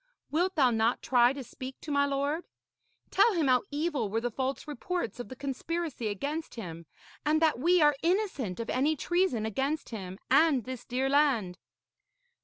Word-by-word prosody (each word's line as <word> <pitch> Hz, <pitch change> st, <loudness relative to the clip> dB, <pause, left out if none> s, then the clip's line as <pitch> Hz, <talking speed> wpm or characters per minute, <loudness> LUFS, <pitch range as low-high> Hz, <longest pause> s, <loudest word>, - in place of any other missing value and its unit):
Wilt 360 Hz, +5 st, +1 dB
thou 265 Hz, -6 st, +4 dB
not 225 Hz, +1 st, +1 dB
try 245 Hz, -1 st, +4 dB
to 275 Hz, 0 st, -6 dB
speak 260 Hz, +2 st, -9 dB
to 305 Hz, -, -6 dB
my 285 Hz, 0 st, +3 dB
lord? 285 Hz, +4 st, -1 dB, 0.7 s
Tell 415 Hz, +3 st, +5 dB
him 325 Hz, -3 st, +2 dB
how 255 Hz, -2 st, +4 dB
evil 290 Hz, -7 st, -1 dB
were 220 Hz, +3 st, 0 dB
the 240 Hz, +1 st, -2 dB
false 265 Hz, +5 st, -3 dB
reports 345 Hz, +2 st, -3 dB
of 245 Hz, -, -6 dB
the 260 Hz, -, -7 dB
conspiracy 280 Hz, 0 st, -3 dB
against 285 Hz, +10 st, -4 dB
him, 170 Hz, -7 st, -7 dB, 0.4 s
and 305 Hz, +1 st, +2 dB
that 315 Hz, -6 st, +2 dB
we 345 Hz, +3 st, +4 dB
are 295 Hz, -1 st, +5 dB
innocent 335 Hz, -, 0 dB
of 230 Hz, -, -3 dB
any 290 Hz, +5 st, +2 dB
treason 345 Hz, -, 0 dB
against 270 Hz, +8 st, -2 dB
him 190 Hz, -5 st, -6 dB
and 280 Hz, -3 st, +5 dB
this 255 Hz, +1 st, -7 dB
dear 255 Hz, +2 st, -1 dB
land.' 265 Hz, -11 st, +2 dB
275 Hz, 175 wpm, -29 LUFS, 240-315 Hz, 0.7 s, Tell